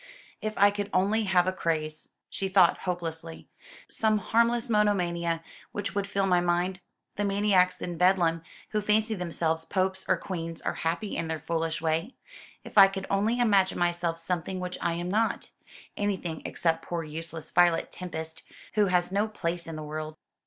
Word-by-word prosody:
"If 215 0 -3
I 205 +1 +6
could 205 0 -4
only 210 +4 +2
have 185 -2 +3
a 185 - +1
craze," 155 -4 -2 0.2
she 195 - -3
thought 185 -3 +5
hopelessly, 165 -2 -5 0.4
"some 215 -1 +1
harmless 235 +3 +2
monomania 175 -6 +1 0.3
which 205 -1 -3
would 200 -1 -1
fill 200 -1 0
my 180 -2 +3
mind! 175 +2 0 0.4
The 205 - 0
maniacs 195 -2 +3
in 175 -2 -5
Bedlam, 175 -3 +3 0.3
who 215 - 0
fancy 215 +2 +2
themselves 165 -3 -1
popes 190 +2 -1
or - - +3
queens, 165 -3 -5
are - - -2
happy 170 +6 -2
in 165 - -2
their 160 -1 -3
foolish 165 +1 -2
way. 165 +9 -1 0.5
If - - +2
I 195 - +10
could 195 0 -5
only 215 +5 +1
imagine 200 -5 +3
myself 175 -1 0
something 180 +2 -2
which 180 0 -5
I 170 - +1
am 175 +2 -3
not 225 +2 0 0.4
anything 185 -6 -2
except 165 -1 0
poor 170 -1 -4
useless 160 +1 -7
Violet 175 -1 +3
Tempest, 160 -3 -6 0.3
who 210 -2 +3
has 180 -1 +1
no 205 +3 +1
place 175 -5 -3
in 165 - -5
the 155 - -6
world!" 155 +1 -5
180 Hz, 170 wpm, -28 LUFS, 165-200 Hz, 0.5 s, I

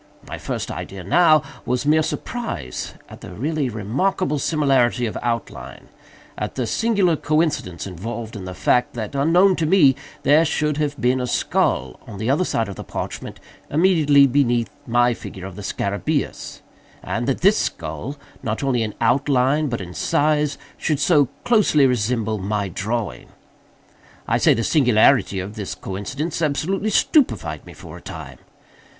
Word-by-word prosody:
My - - -6
first - - -4
idea, 95 -2 -7
now, 155 - +4 0.2
was 125 +2 -1
mere 155 +2 +4
surprise 150 - -4
at - - -13
the - - -9
really 145 +2 -1
remarkable 140 - -1
similarity 135 -6 +2
of 110 - -4
outline—at 115 -1 -6
the 125 - -1
singular 200 - +2
coincidence 155 - -1
involved 110 +5 -6
in 95 -3 -7
the 95 0 -7
fact, 125 +5 +1
that 110 0 -5
unknown 175 +7 +4
to 160 - 0
me, 150 -7 +5 0.3
there 150 +3 +5
should 150 -2 0
have 145 -2 -2
been 125 +1 +2
a 125 - -2
skull - - 0
upon 105 -4 -10
the 110 +5 0
other 150 +6 +2
side 115 -10 -1
of 100 - -8
the - - -6
parchment, - - -6 0.3
immediately 150 -4 +4
beneath 120 -4 +1 0.2
my 120 +1 +3
figure 100 -4 -9
of 95 -2 -8
the 105 - -8
scarabæus, 100 +9 -3 0.4
and 120 +2 -3
that 135 - -1
this 200 +4 +5
skull, 85 - -4 0.2
not 110 +4 -3
only 130 -3 +1
in 110 -2 -3
outline, 135 +4 +2
but 115 -5 -3
in 90 -2 -8
size, 150 +3 +1 0.2
should 150 -3 0
so 145 -2 +4 0.2
closely 210 - +4
resemble 115 -3 0
my 100 +1 -2
drawing. 105 +4 -4 1.0
I - - +1
say - - +4
the 115 - -1
singularity 125 - +3
of 95 +2 -5
this 105 -3 -5
coincidence 135 - -4
absolutely 165 +8 0
stupefied 275 +6 +1
me - - -11
for - - -11
a - - -13
time. - - -9
130 Hz, 155 wpm, -21 LUFS, 110-155 Hz, 1.0 s, me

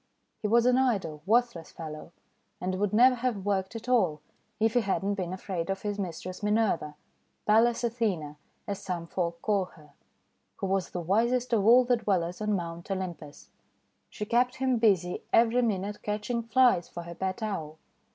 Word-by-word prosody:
He 210 - 0
was 235 +2 +4
an 250 +1 +4
idle, 195 - 0
worthless 235 -6 +1
fellow, 155 -1 -8 0.5
and 185 +1 -2
would 205 -1 +1
never 250 +4 +6
have 235 -6 -2
worked 195 +1 -1
at 225 +2 -7
all, 185 -12 +2 0.4
if 220 0 +2
he 245 - +3
had 195 -2 -1
not 200 +1 0
been 180 -3 -3
afraid 185 -2 -4
of 195 0 -3
his 205 -1 -3
mistress 185 0 -5
Minerva, 210 -8 +1 0.3
— - - -45
Pallas 230 +3 +3
Athena 210 -11 -1 0.3
as 200 -2 -4
some 180 -3 -4
folk 170 -1 -3
call 205 -3 +1
her, 150 -5 -18 0.3
— - - -47
who - - -3
was 190 -2 0
the 180 - -4
wisest 235 +7 +1
of 210 -2 +3
all 245 +2 +8
the 245 0 +3
Dwellers 185 -4 -1
on 210 0 0
Mount 170 -1 -5
Olympus. 175 -6 -6 0.6
She 210 - -5
kept 245 +3 +2
him 260 -2 +1
busy 185 -6 +2
every 235 +2 +4
minute 205 -3 -2
catching 210 +3 -2
Flies 230 -6 +3
for 175 - -7
her 170 0 -8
pet 190 +6 -3
Owl. 160 -8 -4
200 Hz, 180 wpm, -28 LUFS, 180-230 Hz, 0.6 s, all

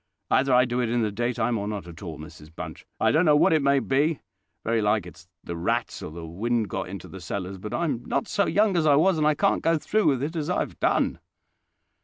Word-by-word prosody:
"Either 135 +1 +3
I 125 0 +5
do 120 0 -2
it 120 - 0
in 120 0 +1
the 105 - 0
daytime 120 +1 -1
or 100 - -3
not 105 -3 -4
at 85 -1 -11
all, 85 -6 -6
Mrs 75 0 -12
Bunch. - - -8
I - - +3
don't 160 +3 +3
know 150 -4 +5
what 150 - +4
it 155 - +3
may 140 0 +3
be: 140 +3 +1 0.4
very 115 0 +1
like 105 -2 +1
it's 90 0 -13 0.2
the 85 - -5
rats, 85 +1 -2
or - - -6
the 85 +1 -8
wind 110 +6 -1
got - - -4
into 95 -2 -8
the 95 - -10
cellars; 95 +2 -5
but 105 +3 -7
I'm 145 -9 -1
not 240 - -1
so 205 -2 +1
young 205 -1 +2
as 160 -2 +2
I 145 - +6
was, 165 +3 +3
and 150 - +3
I 155 - +3
can't - - +1
go 165 0 +2
through 215 +7 +1
with 135 -2 +2
it 160 +4 -3
as 155 0 -2
I 180 - +1
have - - -6
done." - - +1
120 Hz, 255 wpm, -25 LUFS, 100-150 Hz, 0.4 s, I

